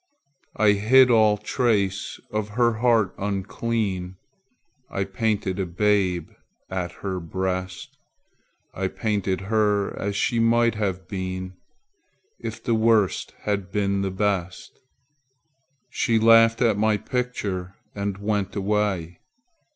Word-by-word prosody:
I 105 -1 +4
hid 125 +5 +5
all 110 -2 +4
trace 105 -3 -1
of 105 0 -2
her 120 -2 +2
heart 115 -5 +3
unclean; 100 -1 -2 0.7
I 100 - -2
painted 100 -1 -1
a 95 - -1
babe 90 -2 +1 0.4
at 90 -2 -3
her 95 -2 -2
breast; 95 +2 -4 0.7
I 95 0 -2
painted 100 -2 -2
her 105 0 +1
as 100 0 -3
she 115 +3 +1
might 115 +1 +3
have 95 -4 -3
been 95 -1 -5 0.9
If - - -6
the 120 - 0
Worst 110 -3 +2
had 100 -2 -2
been 100 -1 0
the 100 - -1
Best. 95 -2 -2 1.1
She 115 - +1
laughed 115 +1 +5
at 110 -4 +2
my 110 0 +3
picture 100 -6 -3 0.2
and 100 -1 -3
went 100 -1 -2
away. 100 -4 -1
100 Hz, 115 wpm, -24 LUFS, 95-110 Hz, 1.1 s, hid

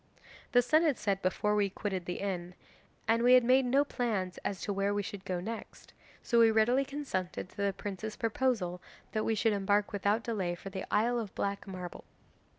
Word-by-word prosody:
'The 245 0 +6
sun 310 +6 +4
had 310 -6 +2
set 200 -2 -1
before 210 +3 +1
we 205 -1 +2
quitted 190 -2 -3
the 175 - -4
inn, 180 -3 -3 0.5
and 225 +1 +3
we 250 +1 +7
had 250 - +6
made 255 +2 +4
no 275 +4 +3
plans 210 -10 -2
as 195 - -3
to 205 - -2
where 200 +1 0
we 205 - 0
should 205 -1 -7
go 185 -2 -2
next, 225 +5 -7 0.3
so 235 - +3
we 230 -1 +7
readily 225 +5 +3
consented 270 -12 -4
to - - -21
the 200 0 +1
prince's 205 +3 -5
proposal 225 -6 0 0.3
that 215 - -1
we 225 - +1
should 220 +1 +2
embark 205 +1 +1
without 205 +3 +1
delay 190 -7 -1
for 195 +3 -9
the 190 0 -5
Isle 240 +3 +2
of 215 -4 -6
Black 200 +1 -2
Marble. 180 -2 -7
205 Hz, 200 wpm, -31 LUFS, 190-235 Hz, 0.5 s, we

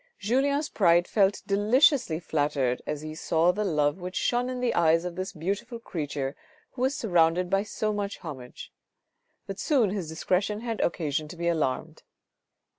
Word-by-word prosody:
Julien's 280 +7 +1
pride 175 -3 +3
felt 200 -2 +2
deliciously 210 - +3
flattered 145 -6 0
as 150 -1 -3
he 155 0 -6
saw 165 +2 +2
the 210 +4 -2
love 150 -3 +1
which 180 +1 -6
shone 245 +1 +1
in 255 -1 -4
the 245 -1 0
eyes 165 0 +3
of 175 -1 -4
this 185 +1 -4
beautiful 200 +8 -4
creature 145 -10 -4 0.4
who 250 - -8
was 265 +2 +1
surrounded 175 -2 +2
by 195 0 +3
so 215 0 -2
much 205 -1 -3
homage; 130 -7 -9 0.7
but 195 - -7
soon 250 -10 +2
his 190 -6 -3
discretion 185 +6 -1
had 230 -2 -3
occasion 155 -3 -1
to 165 - -9
be 170 0 -2
alarmed. 155 -6 -1
180 Hz, 165 wpm, -27 LUFS, 160-215 Hz, 0.7 s, pride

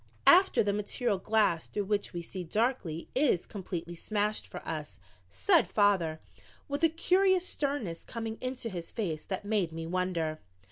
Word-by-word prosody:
"After 370 - +7
the 205 -1 +1
material 210 +1 -1
glass 210 -5 +2
through 205 - -2
which 205 0 -1
we 175 -1 -5
see 185 +2 -6
darkly 190 -4 -1
is 260 - +2
completely 175 -4 -5
smashed 210 +4 -1
for - - -9
us," - - -5 0.3
said 365 -5 +4
father, 190 -7 +2 0.5
with 285 +3 -3
a 330 - +7
curious 370 +3 +3
sternness 265 - -2
coming 225 -1 -5
into 255 -1 -3
his 175 -6 -5
face 165 -9 -3
that 190 +1 -4
made 205 -5 +1
me 165 0 -5
wonder. 170 -3 -1
205 Hz, 155 wpm, -30 LUFS, 175-250 Hz, 0.5 s, After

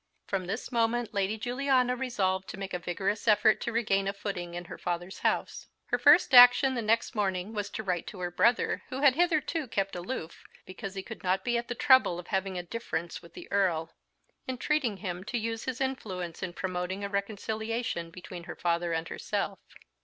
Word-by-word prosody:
From 190 -2 -2
this 220 +7 -4
moment 235 -1 +1
Lady 200 +1 0
Juliana 250 +1 +1
resolved 195 -7 -1
to - - -7
make 195 0 -6
a 180 - -1
vigorous 195 +5 -2
effort 215 0 +5
to - - -2
regain 195 -4 +1
a 195 - 0
footing 180 -4 -5
in 175 0 -5
her - - -9
father's 175 +2 -4
house. - - -1 0.2
Her - - 0
first - - +6
action 245 +2 +9
the 240 - -1
next 225 +3 +1
morning 195 -1 -1
was 205 -2 -3
to 220 - -5
write 180 -4 -2
to 200 - -8
her 175 0 -2
brother, 235 +7 +2
who 260 +1 -4
had 280 -3 +6
hitherto 325 -2 +1
kept 195 -4 -1
aloof, 175 -2 -5 0.2
because 190 +1 -7
he 195 - -4
could 225 - -9
not 185 +1 +1
be 240 -1 +1
at 235 0 -1
the 245 - -3
trouble 260 -9 +5
of 175 - -9
having 190 -1 -1
a 175 - -3
difference 170 -4 -4
with 170 -1 -16
the - - -9
Earl, 170 -5 +1 0.5
entreating 260 -3 0
him 180 -2 -5
to 230 +3 -2
use 225 0 -3
his 255 -2 -3
influence 190 -11 -3
in 185 -2 -4
promoting 185 +1 -3
a - - -1
reconciliation 215 -1 -3
between 175 0 -9
her - - -7
father 170 0 0
and 160 0 -2
herself. - - -3
200 Hz, 200 wpm, -29 LUFS, 180-240 Hz, 0.5 s, action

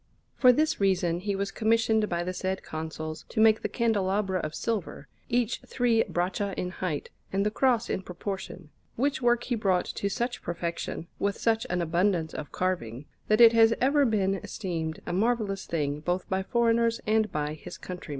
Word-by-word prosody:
For 255 -2 +7
this 310 0 +1
reason 180 -3 +2
he 200 +2 -2
was 195 0 -2
commissioned 220 -1 +2
by 170 0 -1
the 185 +1 -3
said 190 +1 -3
Consuls 155 0 -5
to - - -3
make 220 0 +5
the - - -2
candelabra 200 -4 0
of 155 -2 -4
silver, 220 -6 -3 0.2
each 240 -1 0
three 240 -3 +2
braccia 185 +3 -1
in 180 - -2
height, 180 -6 -4 0.2
and 195 +1 +1
the 210 - +1
Cross 240 -1 +2
in - - -2
proportion; 185 -3 -6 0.2
which 275 +3 0
work 240 -1 +3
he 250 - -2
brought 195 -5 +1
to 200 - -3
such 240 +5 -2
perfection, 170 -1 -4
with 200 0 0
such 225 -1 +1
an 180 -1 0
abundance 170 -1 +1
of 150 - -6
carving, 145 -9 -2 0.2
that 215 +2 +4
it 230 -1 +9
has 225 0 +5
ever 285 +3 +4
been 205 -6 +2
esteemed 165 -5 -4
a - - -3
marvellous 210 -1 0
thing 145 -3 -1
both 180 +4 -2
by 190 0 0
foreigners 230 +2 +2
and 215 0 +2
by 150 0 -2
his 155 - -9
countrymen. 180 -3 -8
195 Hz, 180 wpm, -28 LUFS, 175-225 Hz, 0.2 s, it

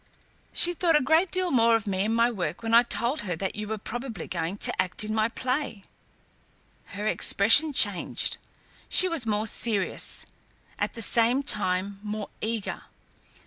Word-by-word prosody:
"She 350 - +2
thought 335 -1 +2
a - - +6
great 320 +7 +3
deal 370 -1 0
more 230 -2 +4
of 225 - -1
me 195 -1 -1
and 225 +1 0
my 235 +1 +3
work 180 -2 -4
when 225 0 -2
I 235 - +8
told 245 +4 -1
her 180 -4 -3
that 190 +3 -3
you 210 0 -5
were 220 +1 -3
probably 240 +2 -6
going 170 +2 -3
to - - +2
act 185 +3 -1
in 215 0 -3
my 220 +1 +1
play." 255 -4 -3 1.1
Her 205 - -4
expression 225 +8 +4
changed. 205 -9 +1 0.5
She 370 - +3
was 325 -10 0
more 210 0 0
serious, 210 -3 0 0.5
at - - -2
the 230 - -3
same 240 +5 +2
time 195 -3 -2
more 210 0 -5
eager. 220 -2 -3
225 Hz, 170 wpm, -26 LUFS, 205-255 Hz, 1.1 s, I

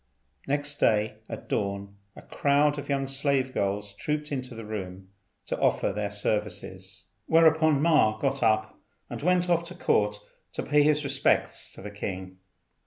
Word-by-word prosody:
Next 145 +1 +1
day 105 0 +2
at - - -7
dawn 100 0 -2 0.2
a - - -12
crowd 145 +1 +2
of 145 - -8
young 135 -1 0
slave 135 -1 +1
girls 100 +1 -2
trooped 150 +7 -3
into 130 -3 -4
the 115 -1 -8
room 95 -3 -6 0.4
to - - -3
offer - - +1
their 105 0 -2
services; 105 +1 -3 0.2
whereupon 160 -2 +4
Ma 150 -10 +4
got 135 +3 -1
up 110 -1 +1 0.3
and - - -5
went 180 +2 +2
off 170 -1 +2
to 180 +1 -10
Court 105 -11 +1 0.4
to - - -3
pay 150 0 +3
his 150 0 +3
respects 135 -1 0
to - - -12
the 105 - -7
king. 95 -2 -6
130 Hz, 160 wpm, -27 LUFS, 105-150 Hz, 0.4 s, whereupon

